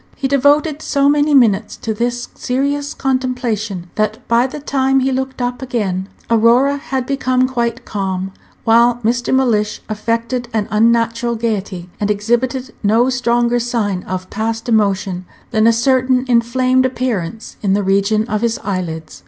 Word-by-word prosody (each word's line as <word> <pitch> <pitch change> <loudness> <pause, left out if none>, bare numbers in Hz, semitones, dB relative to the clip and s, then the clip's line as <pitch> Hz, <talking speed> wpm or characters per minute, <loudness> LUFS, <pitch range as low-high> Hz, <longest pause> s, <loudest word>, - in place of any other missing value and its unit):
He 270 - -1
devoted 285 +3 +2
so 280 -1 +1
many 290 0 +3
minutes 225 -7 +3
to 220 - -3
this 240 +2 -2
serious 280 +3 -2
contemplation 240 -8 -2
that 215 0 -2
by 235 +2 +3
the 295 - -7
time 270 -1 +1
he 265 +1 +1
looked 265 -1 -3
up 245 +1 -3
again 200 -7 -2 0.2
Aurora 235 +5 +4
had 265 -2 -3
become 255 -1 +1
quite 240 -1 -2
calm, 190 -2 -3 0.3
while 235 +1 +4
Mr. 240 +2 0
Mellish 225 -6 +1
affected 230 +3 -2
an 215 -2 0
unnatural 230 +2 +2
gayety, 205 -6 -3
and 205 - -1
exhibited 240 +5 -1
no 230 +5 +3
stronger 240 -1 +1
sign 225 -6 -1
of 185 0 -4
past 225 +2 -3
emotion 195 -5 0 0.2
than 220 -1 +3
a - - +7
certain 255 +2 +2
inflamed 255 +2 +2
appearance 230 -6 -4
in 195 -2 +1
the 205 +1 +1
region 200 +3 +2
of 215 -3 -1
his 235 0 0
eyelids. 165 - -4
235 Hz, 150 wpm, -17 LUFS, 210-255 Hz, 0.3 s, a